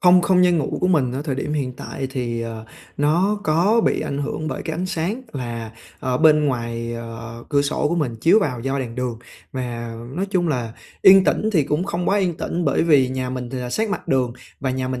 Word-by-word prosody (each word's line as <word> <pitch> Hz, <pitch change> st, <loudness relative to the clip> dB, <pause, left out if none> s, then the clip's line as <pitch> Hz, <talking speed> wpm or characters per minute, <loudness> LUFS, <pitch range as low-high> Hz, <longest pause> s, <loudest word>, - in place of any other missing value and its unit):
Không 180 Hz, 0 st, +6 dB
không 180 Hz, 0 st, +4 dB
gian 175 Hz, -2 st, +4 dB
ngủ 140 Hz, -, -2 dB
của 180 Hz, -, +2 dB
mình 140 Hz, -9 st, +2 dB
ở 135 Hz, +3 st, -3 dB
thời 145 Hz, -4 st, -2 dB
điểm 145 Hz, +2 st, -3 dB
hiện 135 Hz, -4 st, -1 dB
tại 135 Hz, -, -5 dB
thì, 120 Hz, -3 st, -2 dB
ờ, 115 Hz, -1 st, -6 dB, 0.3 s
nó 175 Hz, +8 st, +2 dB
có 190 Hz, +8 st, +3 dB
bị -, -, +2 dB
ảnh 140 Hz, -, -3 dB
hưởng 155 Hz, +2 st, -3 dB
bởi 130 Hz, -, -4 dB
cái 160 Hz, -, -3 dB
ánh 180 Hz, +2 st, -2 dB
sáng 190 Hz, +8 st, -2 dB
là 115 Hz, -4 st, -5 dB, 0.3 s
ở 125 Hz, -1 st, 0 dB
bên 155 Hz, -1 st, +5 dB
ngoài, 115 Hz, -2 st, -2 dB
à, 115 Hz, 0 st, -7 dB
cửa 140 Hz, -1 st, +3 dB
sổ 145 Hz, +1 st, 0 dB
của 170 Hz, -, 0 dB
mình 140 Hz, -9 st, -1 dB
chiếu 165 Hz, -, +5 dB
vào 125 Hz, -, -1 dB
do 135 Hz, +2 st, -1 dB
đèn 120 Hz, -3 st, -4 dB
đường. 125 Hz, -2 st, -3 dB, 0.3 s
Mà 120 Hz, -3 st, -4 dB, 0.2 s
nói 195 Hz, +2 st, 0 dB
chung 175 Hz, -3 st, +1 dB
là 120 Hz, -6 st, -2 dB, 0.3 s
yên 190 Hz, 0 st, +8 dB
tĩnh 220 Hz, -, +1 dB
thì 160 Hz, -7 st, +3 dB
cũng 150 Hz, +5 st, 0 dB
không 175 Hz, -2 st, -2 dB
quá 200 Hz, -, +3 dB
yên 180 Hz, -4 st, 0 dB
tĩnh, 175 Hz, +1 st, -2 dB
bởi 140 Hz, -, +2 dB
vì 145 Hz, -6 st, +4 dB
nhà 130 Hz, -1 st, -3 dB
mình 125 Hz, -1 st, -5 dB
thì 130 Hz, -, -4 dB
là 125 Hz, -1 st, -4 dB
sát 220 Hz, -, 0 dB
mặt -, -, -4 dB
đường 130 Hz, -3 st, +2 dB, 0.3 s
và 135 Hz, -, -1 dB
nhà 130 Hz, 0 st, -2 dB
mình 130 Hz, -1 st, -3 dB
140 Hz, 240 wpm, -22 LUFS, 125-175 Hz, 0.3 s, yên